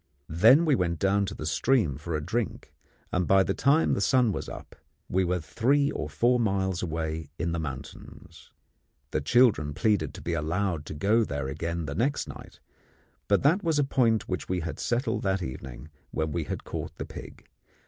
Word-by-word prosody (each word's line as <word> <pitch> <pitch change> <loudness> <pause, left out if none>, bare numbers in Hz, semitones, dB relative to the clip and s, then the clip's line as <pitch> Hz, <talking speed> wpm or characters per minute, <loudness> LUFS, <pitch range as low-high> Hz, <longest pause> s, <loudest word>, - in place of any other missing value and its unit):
Then 130 - +6
we 155 - +3
went 90 -7 0
down 100 +3 +2
to - - -5
the 75 - -6
stream 85 - +2
for 80 +3 -4
a 75 -1 -3
drink, 120 +3 -3 0.4
and 90 -1 0
by 95 0 +5
the 95 - -1
time 140 +9 +3
the - - 0
sun 125 +2 +3
was - - -4
up - - -10 0.3
we 95 +1 +1
were 90 0 0
three 140 - +1
or 75 - -4
four 120 - +2
miles 95 -5 0
away 80 -2 -3
in 85 0 -1
the 85 - -2
mountains. 70 -3 -9 0.6
The 75 - 0
children 80 - +3
pleaded 100 -1 +1
to - - -9
be 85 - -2
allowed 85 0 -1
to - - -6
go 105 +8 +3
there 70 -8 -3
again 85 +4 -3
next 115 - -1
night, - - -11 0.7
but 100 - +2
that 165 +8 +3
was 165 -3 +1
a 145 - +4
point 120 -5 +2
which 90 -1 -4
we 90 -1 0
had 80 0 -5
settled 120 +3 -1
that 95 -1 0
evening 65 +2 -8 0.2
when 80 -1 -2
we - - -2
had - - -5
caught - - -6
the - - -5
pig. - - -11
95 Hz, 190 wpm, -27 LUFS, 80-115 Hz, 0.7 s, Then